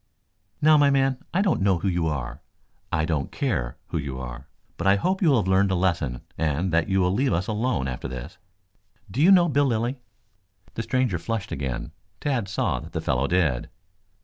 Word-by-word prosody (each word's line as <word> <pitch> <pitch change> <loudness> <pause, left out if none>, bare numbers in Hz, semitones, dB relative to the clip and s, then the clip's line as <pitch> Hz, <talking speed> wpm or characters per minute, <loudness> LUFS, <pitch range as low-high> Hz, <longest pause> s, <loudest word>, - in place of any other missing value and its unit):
"Now, 155 0 +7
my 145 -1 +5
man, 135 -2 +2
I 190 +4 +2
don't 190 - +1
know 95 -2 +3
who 90 - -2
you 85 -3 0
are; 70 -5 -4 0.5
I 80 0 +1
don't 75 -5 -2
care 80 - -2
who 80 - -1
you 70 -3 -5
are. 65 +2 -7 0.3
But - - -2
I 100 - +6
hope 185 - 0
you 170 - +4
will 135 - +5
have 105 - 0
learned 95 +1 +3
a 95 - +1
lesson 85 -9 0 0.2
and 80 +3 0
that 85 +2 +2
you 95 0 +2
will 90 0 +2
leave 130 +6 +1
us 85 +3 0
alone 110 - -1
after 65 -1 -4
this. 65 +8 -8 0.7
Do 130 - -1
you 170 - +6
know 180 -3 +7
Bill 145 -2 +2
Lilly?" 120 +1 0 0.8
The - - -3
stranger 125 -7 0
flushed 115 0 -3
again. 65 -3 -4 0.3
Tad 130 -8 -1
saw 95 - -1
that - - -11
the - - -1
fellow 65 +1 0
did. 80 -9 +1
95 Hz, 200 wpm, -25 LUFS, -, 0.8 s, Now